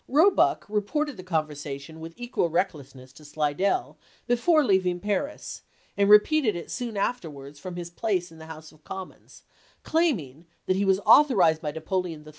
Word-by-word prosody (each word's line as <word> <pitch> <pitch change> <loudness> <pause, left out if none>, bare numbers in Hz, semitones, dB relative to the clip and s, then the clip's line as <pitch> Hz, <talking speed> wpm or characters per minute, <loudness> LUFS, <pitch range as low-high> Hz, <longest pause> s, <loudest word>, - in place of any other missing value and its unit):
Roebuck 330 +9 +3
reported 245 +8 -1
the - - -7
conversation 155 -3 -4
with 165 +1 -9
equal 240 -8 -1
recklessness 140 -7 -3
to 150 - -16
Slidell 155 - -1 0.3
before 300 +6 +3
leaving 185 -6 +1
Paris, 210 +10 -3 0.3
and 200 0 +2
repeated 215 - +5
it 170 - -7
soon 235 -4 -4
afterwards 150 - -4
from 180 +2 -7
his 175 -1 -7
place 180 -3 -2
in 160 - -15
the 160 - -11
House 160 -1 -10
of 155 -1 -23
Commons, 190 -1 -10 0.4
claiming 175 - -1 0.2
that 185 - +1
he 200 +1 0
was 190 0 +3
authorized 195 - +5
by 150 - -3
Napoleon 160 0 -4
III. - - -11
180 Hz, 160 wpm, -26 LUFS, 155-220 Hz, 0.4 s, repeated